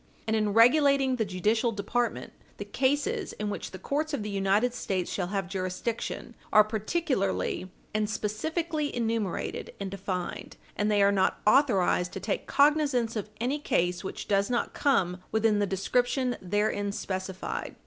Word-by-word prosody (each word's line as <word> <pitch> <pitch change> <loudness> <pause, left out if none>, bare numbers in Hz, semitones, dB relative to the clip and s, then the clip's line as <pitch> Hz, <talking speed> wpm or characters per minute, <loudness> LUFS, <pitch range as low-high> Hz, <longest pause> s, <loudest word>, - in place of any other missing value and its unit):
And 220 - 0
in 215 -1 +1
regulating 265 +2 +5
the 220 - +1
judicial 210 +5 +1
department, 230 +3 -2 0.2
the - - -5
cases 295 - 0
in 210 -1 -3
which - - -5
the 190 - -8
courts 290 - -1
of 220 - -4
the 210 - -4
United 200 +5 +2
States 190 -6 -2
shall 180 -3 -1
have 195 -1 -2
jurisdiction 185 +4 -3 0.2
are 215 0 +8
particularly 215 - -1 0.2
and 215 0 0
specifically 305 - -2
enumerated 225 -5 -2
and 195 -1 -4
defined, 190 -2 -4 0.2
and 210 +1 0
they 205 -1 +4
are 200 - +5
not 195 -2 +1
authorized 205 -8 +3
to - - -4
take 195 +2 -3
cognizance 280 -6 +3
of 215 -1 -3
any 260 +6 0
case 175 -9 0
which 190 - -6
does 200 0 +2
not 240 -1 -1
come 185 - +1
within 220 -1 +2
the 205 - +1
description 245 +6 0
therein 205 +1 0
specified. 190 -1 -4
215 Hz, 155 wpm, -28 LUFS, 195-250 Hz, 0.2 s, are